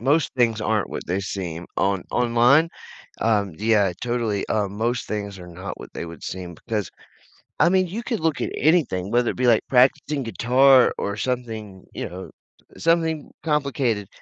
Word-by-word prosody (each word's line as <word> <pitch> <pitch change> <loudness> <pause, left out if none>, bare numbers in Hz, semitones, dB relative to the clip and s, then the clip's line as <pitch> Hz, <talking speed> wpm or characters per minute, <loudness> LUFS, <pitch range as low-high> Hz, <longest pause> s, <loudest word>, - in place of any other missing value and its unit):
most 145 +5 +2
things 115 -3 +2
aren't 105 -1 0
what - - -6
they 95 +3 -1
seem 90 -4 -5
on 95 -2 +1
online. 125 +7 +4 0.5
Um, 105 -5 +1
yeah, 105 -4 +3
totally. 120 -4 -1
Uh, 105 -2 0
most 115 +4 -2
things 100 -2 -4
are 90 - -10
not 90 +3 -7
what - - -11
they - - -4
would 85 -2 -10
seem 90 -2 -6
because, 105 0 -3 0.7
I - - +6
mean, 185 -1 +3
you 220 +7 -5
could 230 -4 -2
look 160 -3 0
at - - -2
anything, 135 - +2
whether 120 0 +2
it - - -10
be, 125 -1 +1
like, 115 -2 +5
practicing 135 +2 +3
guitar 125 +4 +5
or 100 0 -2
something, 110 -6 -4
you - - -4
know, 95 +2 -8 0.5
something 165 -2 +1
complicated, 140 -9 0
115 Hz, 170 wpm, -23 LUFS, 100-135 Hz, 0.7 s, I